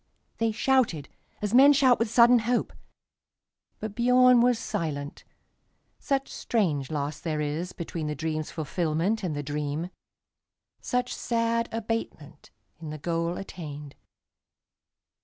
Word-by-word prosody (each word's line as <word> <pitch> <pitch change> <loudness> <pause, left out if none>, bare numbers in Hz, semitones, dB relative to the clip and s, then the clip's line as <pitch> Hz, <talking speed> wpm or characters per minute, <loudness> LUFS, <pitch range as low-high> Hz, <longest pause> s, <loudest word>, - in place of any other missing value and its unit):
They 225 -1 +2
shouted 225 - +1 0.3
as 210 +1 -1
men 275 +3 +8
shout 265 -3 +4
with 230 -1 0
sudden 240 +2 +6
hope; 240 +2 -1 1.1
But 215 -2 -5
Biörn 250 +1 +5
was 245 -1 +3
silent, 145 -7 -4 0.8
such 275 -1 -1
strange 155 - -1
loss 145 -1 -3
there 160 -2 -3
isBetween 160 +1 -4
the 150 - -3
dream's 155 0 -3
fulfilment 165 +6 -1
and 175 -6 -3
the 145 - -3
dream, 150 +4 -3 0.9
Such 250 0 -1
sad 230 0 0
abatement 225 -10 -5 0.3
in 160 -2 -7
the 155 - -6
goal 170 +2 -2
attained. 150 -7 -8
180 Hz, 120 wpm, -27 LUFS, 150-235 Hz, 1.1 s, men